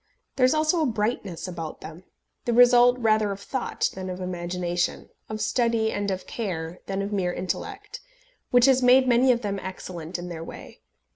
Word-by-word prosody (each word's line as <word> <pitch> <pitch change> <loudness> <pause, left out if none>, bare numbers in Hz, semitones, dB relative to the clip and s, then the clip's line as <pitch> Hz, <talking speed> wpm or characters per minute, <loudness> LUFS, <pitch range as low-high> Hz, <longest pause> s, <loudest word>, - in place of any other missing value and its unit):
There 255 -1 +4
is 255 - +2
also 310 +2 +2
a 305 - +2
brightness 210 -6 -2
about 165 -3 -6
them 165 +4 -10 0.4
the 240 - +1
result 245 +1 +6
rather 215 -3 +2
of 195 - -5
thought 250 +5 -2
than 190 0 -6
of 180 0 -5
imagination, 175 -1 -2 0.2
of 215 0 -4
study 230 -3 +1
and 205 0 -2
of 190 -1 -3
care, 175 -6 -4
than 195 0 -2
of 200 +1 -4
mere 185 -3 0
intellect 405 - -5 0.5
which 245 0 +5
has 265 -1 +4
made 255 +1 +5
many 250 +1 +5
of 240 -1 +1
them 200 -1 -2
excellent 180 -3 -6
in 175 0 -7
their 165 -2 -6
way. - - -11
205 Hz, 185 wpm, -25 LUFS, 180-245 Hz, 0.5 s, result